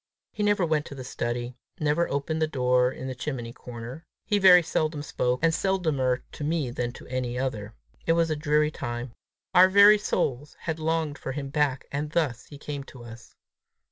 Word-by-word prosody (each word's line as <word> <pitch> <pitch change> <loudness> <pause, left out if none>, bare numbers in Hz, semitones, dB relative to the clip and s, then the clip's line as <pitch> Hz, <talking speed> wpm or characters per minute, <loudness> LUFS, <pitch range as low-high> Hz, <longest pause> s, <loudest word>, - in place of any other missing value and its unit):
He - - -6
never 205 -3 +2
went 155 -2 0
to 140 - -8
the 130 - -7
study; 120 0 -3 0.3
never 150 +3 +1
opened 150 +3 -2
the 155 - +3
door 125 -3 +2
in 130 - -8
the 130 - -3
chimney 125 -2 -5
corner. 120 +6 -9 0.2
He 205 -2 +1
very 180 -2 +8
seldom 155 -2 -1
spoke, 125 -3 -1
and 165 0 +4
seldomer 155 -10 0
to - - -7
me 150 -4 -1
than 120 0 -2
to - - -12
any 125 -1 -3
other. 115 -5 -3 0.3
It 165 - +5
was 165 -1 +2
a - - +1
dreary 150 0 +2
time! 120 -3 -5 0.4
Our 185 +1 +7
very 200 +2 +7
souls 145 -7 -2
had 160 -1 -3
longed 160 -2 -1
for 135 - -4
him 140 0 -5
back, 140 -2 0
and 145 +2 -2
thus 130 -8 -1
he 145 - -11
came 145 -1 -6
to 125 -3 -12
us! 115 0 -12
145 Hz, 195 wpm, -26 LUFS, 125-160 Hz, 0.4 s, very